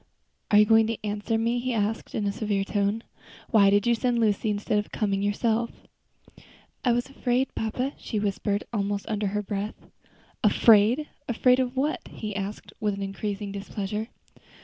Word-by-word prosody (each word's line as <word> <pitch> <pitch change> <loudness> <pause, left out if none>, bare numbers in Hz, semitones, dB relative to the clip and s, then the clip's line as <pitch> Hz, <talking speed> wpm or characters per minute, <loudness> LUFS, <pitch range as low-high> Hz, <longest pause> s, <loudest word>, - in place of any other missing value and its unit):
"Are 205 - +5
you 210 - +7
going 225 +1 +5
to 230 -1 -2
answer 210 +2 -1
me?" 230 +2 +1
he 250 0 -2
asked, 215 +1 -2
in 210 - -1
his 200 0 -2
severe 205 -3 0
tone. 205 +2 0 0.5
"Why 200 -3 +6
did 205 +1 +3
you 240 - +4
send 240 +1 +1
Lucy 215 -1 +1
instead 210 0 0
of 210 - -5
coming 200 -2 0
yourself?" 220 +3 +1 1.1
"I 245 - +3
was 240 +1 0
afraid, 260 -1 -1
papa," 250 +5 -2
she 220 - -4
whispered, 205 0 -1
almost 200 -1 -1
under 210 -1 -1
her 210 +1 -2
breath. 205 +1 -3 0.7
"Afraid! 230 +7 +5 0.2
afraid 250 +2 +4
of 255 0 -1
what?" 290 +4 0
he 210 -2 -6
asked, 200 +1 -5
with 205 -2 -1
increasing 200 +1 -4
displeasure. 200 +2 -4
210 Hz, 165 wpm, -26 LUFS, 205-235 Hz, 1.1 s, you